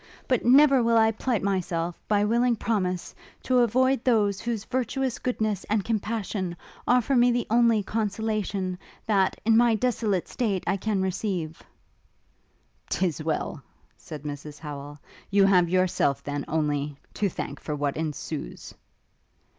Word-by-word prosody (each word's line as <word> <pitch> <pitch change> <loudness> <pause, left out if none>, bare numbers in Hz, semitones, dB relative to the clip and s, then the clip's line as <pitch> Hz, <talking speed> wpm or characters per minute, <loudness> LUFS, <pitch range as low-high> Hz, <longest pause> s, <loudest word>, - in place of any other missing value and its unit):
But 255 -3 +1
never 270 +1 +6
will 230 0 +3
I 220 0 +5
plight 225 -1 -1
myself, 175 -3 -2
by 205 -1 +2
willing 235 +2 +2
promise, 185 -6 -2 0.3
to 255 -1 +3
avoid 255 +2 +2
those 205 -5 +2
whose 230 -3 -3
virtuous 260 0 -2
goodness 215 -6 -1
and 210 -2 0
compassion 210 -4 -2 0.3
offer 250 +2 +3
me 245 0 +5
the 240 -1 0
only 230 -2 +4
consolation, 205 -3 -2 0.3
that, 195 -3 +1
in 225 0 +5
my 235 0 +5
desolate 220 -5 0
state, 205 -7 -1
I - - +1
can 200 -1 -1
receive!' 180 -4 -3 1.3
''Tis 175 -4 -1
well!' 155 -1 -2 0.3
said 150 -3 -9
Mrs 145 0 -7
Howel, 145 -1 -8 0.3
'You 200 0 +4
have 180 -3 +4
yourself, 185 -6 +1
then, 145 0 -4
only, 150 -2 -1 0.2
to 205 - 0
thank - - -6
for 150 - -4
what 145 -1 -1
ensues.' 150 - -5
205 Hz, 140 wpm, -26 LUFS, 170-230 Hz, 1.3 s, never